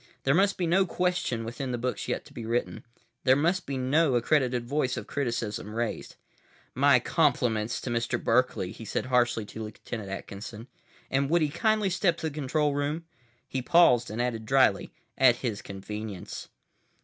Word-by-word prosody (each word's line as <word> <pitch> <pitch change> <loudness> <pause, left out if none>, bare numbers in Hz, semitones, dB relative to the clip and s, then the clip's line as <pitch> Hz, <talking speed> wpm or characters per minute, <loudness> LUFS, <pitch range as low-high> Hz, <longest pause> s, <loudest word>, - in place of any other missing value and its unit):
There 135 - +3
must 195 +4 +3
be 180 - 0
no 185 +3 +3
question 180 -10 -1
within 125 +3 -4
the 120 - -1
books 125 +2 -3
yet - - -2
to - - -16
be 115 - -7
written. 115 +2 -2 0.4
There 130 - +5
must 170 +6 +1
be 135 -1 -2
no 135 +2 +2
accredited 125 -1 +1
voice 130 -1 0
of 115 - -5
criticism 115 -5 -3
raised. 115 -1 -3 0.6
"My - - +5
compliments 110 -1 +1
to 125 - -4
Mr. 120 +1 0
Berkeley," 115 -6 +1
he 110 - -10
said 110 - -2
harshly 120 -3 +2
to 110 +2 -7
Lt. 105 +2 -10
Atkinson, 105 +1 -6 0.5
"and 135 +1 +1
would 170 0 +3
he 150 - +1
kindly 210 +4 +1
step 175 -2 +2
to 160 - -2
the - - -12
control 150 0 0
room?" 145 +4 -2 0.4
He 130 - -3
paused 125 -6 +5
and 110 +3 -5
added 115 -3 -2
dryly, 135 +1 +3 0.3
"At 130 -2 +6
his 115 -5 -3
convenience." 100 0 -7
125 Hz, 175 wpm, -28 LUFS, 115-150 Hz, 0.6 s, At